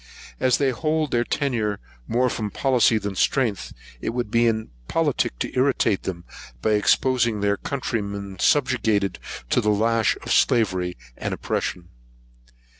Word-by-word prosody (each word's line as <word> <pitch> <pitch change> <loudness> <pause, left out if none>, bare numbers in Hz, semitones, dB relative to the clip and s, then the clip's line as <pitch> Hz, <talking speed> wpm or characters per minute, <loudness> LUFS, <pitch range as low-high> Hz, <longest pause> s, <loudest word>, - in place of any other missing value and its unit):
As 130 -1 +3
they 140 -2 +2
hold 155 +2 -1
their 120 0 +2
tenure 115 -8 -1 0.3
more 125 +2 +2
from 110 -3 -2
policy 125 -2 +3
than 100 -2 -3
strength, 105 -3 0 0.3
it 115 - -3
would 120 -4 -2
be 115 0 +3
impolitic 110 - -1
to - - -4
irritate 130 -6 +2
them, 85 -2 -5 0.3
by 110 - 0
exposing 115 +1 +2
their 100 0 +2
countrymen, 100 -8 -4
subjugated 110 -8 +2 0.3
to - - +3
the 105 - +1
lash 110 +2 +2
of - - -5
slavery 95 -6 +2 0.2
and - - -3
oppression. 85 -1 -3
115 Hz, 135 wpm, -23 LUFS, 100-130 Hz, 0.3 s, As